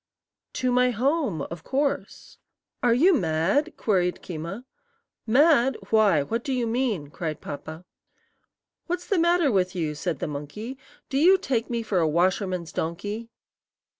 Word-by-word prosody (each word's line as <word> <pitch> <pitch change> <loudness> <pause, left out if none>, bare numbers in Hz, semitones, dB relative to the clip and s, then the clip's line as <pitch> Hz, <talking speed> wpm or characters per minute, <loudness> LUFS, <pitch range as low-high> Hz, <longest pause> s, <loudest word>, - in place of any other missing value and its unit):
"To 255 -1 0
my 250 0 +4
home, 255 - 0
of 170 -1 -8
course." 280 +1 -3 0.4
"Are 245 -3 +3
you 345 +10 +5
mad?" 185 - +1
queried 180 -4 0
Keema. 175 +8 -6 0.6
"Mad? 270 +1 +4
Why, 205 -9 +4
what 230 +11 -3
do 275 - -3
you 250 -2 0
mean?" 225 - -1
cried 160 -2 -4
Papa. 155 +4 -8 1.0
"What's 355 +1 -3
the 395 - +1
matter 340 -3 +3
with 185 -2 +1
you?" 160 -4 -1
said 160 +1 -3
the - - -3
monkey. 150 - -6 0.3
"Do 270 - 0
you 365 +5 +6
take 245 -9 -2
me 235 -1 -2
for 210 -4 0
a 165 - +2
washerman's 180 +1 0
donkey?" 205 +8 -4
220 Hz, 145 wpm, -25 LUFS, 170-265 Hz, 1.0 s, you